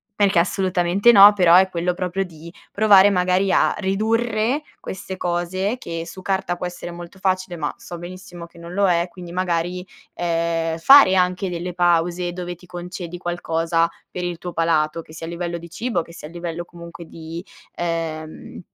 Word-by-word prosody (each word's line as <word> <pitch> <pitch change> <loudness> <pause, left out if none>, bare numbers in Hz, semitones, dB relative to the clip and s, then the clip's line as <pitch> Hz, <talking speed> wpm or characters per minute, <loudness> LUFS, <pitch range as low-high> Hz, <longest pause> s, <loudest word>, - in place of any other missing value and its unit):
perché 200 -4 +3
assolutamente 185 +3 +2
no, 205 -2 +9
però 180 -4 +4
è 190 0 +4
quello 175 0 -1
proprio 185 +1 -2
di 170 -2 -12 0.2
provare 205 -1 +6
magari 185 +1 +2
a - - +3
ridurre 220 +6 0 0.2
queste 190 0 -7
cose, 180 +4 -1
che 165 -6 -6
su 185 +1 -10
carta 190 -2 -1
può 180 - -5
essere 180 0 -6
molto 175 +2 -10
facile 185 -1 -1
ma 150 -3 -2
so 175 -1 -9
benissimo 175 -1 -9
che 170 - -21
non 170 +1 -10
lo 200 +1 +2
è, 170 0 +1
quindi 175 -2 -10
magari, 180 0 -2 0.3
ehm, 165 -1 -1
fare 270 0 +8
anche 180 0 +1
delle 175 +1 -5
pause 175 0 +1
dove 175 0 -5
ti 175 +1 -18
concedi 175 0 -7
qualcosa 165 -1 0 0.2
per 180 - -5
il 175 -1 -4
tuo 175 0 -6
palato, 165 -1 +1
che 155 - -16
sia 165 +1 -7
a - - -5
livello 170 0 -4
di 170 +1 -11
cibo 220 +1 -2
che 170 - -13
sia 150 - -9
a 160 - -14
livello 175 0 -5
comunque 170 0 -11
di, 165 +2 -9 0.3
ehm, 165 -2 -4
175 Hz, 180 wpm, -21 LUFS, 170-190 Hz, 0.3 s, no